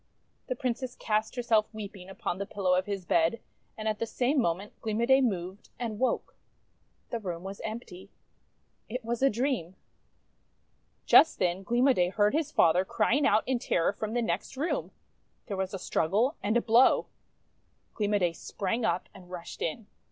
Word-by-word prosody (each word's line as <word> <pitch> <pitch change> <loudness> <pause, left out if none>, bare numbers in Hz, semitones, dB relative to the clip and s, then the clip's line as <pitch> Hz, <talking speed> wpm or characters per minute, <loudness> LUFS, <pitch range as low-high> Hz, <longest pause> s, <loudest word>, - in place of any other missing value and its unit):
The 255 - -2
Princess 250 0 -3
cast 215 +1 -1
herself 230 -3 +2
weeping 200 -4 -8
upon 190 -1 -4
the 200 - -3
pillow 190 -3 0
of 185 +1 +1
his 195 -3 -4
bed; 170 +6 +2 0.4
and 220 0 -4
at 215 -1 -1
the 230 - -1
same 255 +5 +1
moment 185 +2 -2
Gleam 220 -1 -2
o' 235 - +3
Day 265 +2 +5
moved, 190 -5 -2
and 225 -3 -4
woke. 260 - -1 0.8
The 235 - -1
room 175 -5 -5
was 195 +1 -7
empty. 200 -4 -7 0.8
It 245 +1 -5
was 235 +1 -2
a 275 - +5
dream! 235 - -1 1.3
Just 325 - +7
then 180 +1 0
Gleam 240 +6 +2
o' 270 - +6
Day 180 -5 +2
heard 205 +2 +2
his 305 -1 0
father 175 - +4
crying 235 +8 +2
out 215 +2 +3
in 260 -2 +1
terror 170 -4 +1
from 215 +1 -4
the 240 - +1
next 195 +5 -3
room. 310 +6 -1 0.6
There 205 - -4
was 190 0 -2
a 195 - -4
struggle 205 - +1
and 215 +3 +2
a - - +2
blow. 235 +3 +5 0.9
Gleam 210 -1 0
o' - - +5
Day 175 -4 +1
sprang 205 +7 -3
up, 200 -4 0
and 180 -2 -14
rushed 175 -2 -8
in. 185 +7 -3
215 Hz, 180 wpm, -29 LUFS, 185-240 Hz, 1.3 s, Just